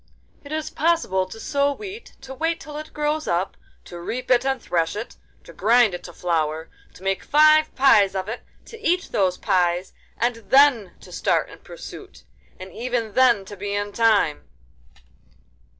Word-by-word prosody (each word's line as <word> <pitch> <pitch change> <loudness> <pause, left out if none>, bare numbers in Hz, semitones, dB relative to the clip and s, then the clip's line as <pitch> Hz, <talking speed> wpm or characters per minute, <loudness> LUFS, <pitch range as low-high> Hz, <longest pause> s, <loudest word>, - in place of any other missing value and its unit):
'It 285 - -11
is 310 0 -3
possible 305 - +1
to 225 - -10
sow 280 +3 +1
wheat, 405 +8 -9
to 265 0 -9
wait 325 +4 -1
till 300 -1 -10
it 305 +1 -7
grows 300 +1 -2
up, 175 +3 -1 0.3
to 175 - -9
reap 250 +9 -4
it 245 -1 +4
and 265 -1 0
thresh 165 -5 -1
it, 215 +3 -6 0.3
to - - -13
grind 230 -2 +4
it 175 0 -6
to 175 - -9
flour, 160 -2 -2 0.2
to - - -15
make 195 0 -1
five 310 +1 +4
pies 210 -8 +5
of 190 0 -3
it, 225 +3 -5 0.2
to 455 - -12
eat 360 -2 0
those 185 -2 +1
pies, 180 0 0 0.2
and 240 0 0
then 265 -8 +5
to - - -15
start - - 0
in - - -13
pursuit—and 190 - -13
even 235 -3 -3
then 240 -6 +4
to 205 - -9
be 200 +1 -4
in 205 0 -2
time. 215 - +2
230 Hz, 170 wpm, -23 LUFS, 190-290 Hz, 0.3 s, pies